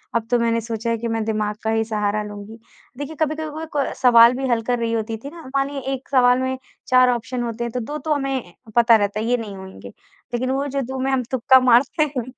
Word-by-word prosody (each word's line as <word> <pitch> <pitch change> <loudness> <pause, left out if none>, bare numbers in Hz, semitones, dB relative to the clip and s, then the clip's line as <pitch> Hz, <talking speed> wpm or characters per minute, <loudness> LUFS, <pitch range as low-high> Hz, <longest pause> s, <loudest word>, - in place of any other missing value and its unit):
अब 230 -1 0
तो 245 - +3
मैंने 230 0 +1
सोचा 225 +1 -4
है 230 - 0
कि 235 +1 -4
मैं 225 -1 -1
दिमाग 215 -1 -1
का 220 - -1
ही 225 0 +1
सहारा 210 -1 -1
लूँगी। 210 +2 -9 0.4
देखिए, 290 +3 -6
कभी-कभी 310 +1 -1
वो 315 +2 -6
को 285 -2 -1
सवाल 235 -2 +7
भी 265 0 -2
हल 235 -1 +2
कर 245 +1 -1
रही 230 -1 -1
होती 225 0 -2
थी - - -4
ना 340 - -10
मानिए 275 +1 0
1 265 0 -7
सवाल 250 -2 +4
में 260 0 -2 0.3
4 255 0 +5
ऑप्शन 240 +1 -3
होते 235 0 -4
हैं, 235 - -3
तो 250 - -1
2 290 +6 -5
तो 310 - +3
हमें 270 - -3 0.2
पता 235 -1 +6
रहता 205 -1 0
है 220 - -2
ये 245 +1 +2
नहीं 215 -4 -7
होंगे। 190 0 -10 0.4
लेकिन 255 +2 -1
वो 275 +2 -1
जो 275 0 -2
2 265 +1 -5
में 270 +1 0
हम 265 -2 +1
तुक्का 260 +1 +5
मारते 255 +5 +3
हैं 245 - 0
240 Hz, 245 wpm, -21 LUFS, 225-265 Hz, 0.4 s, सवाल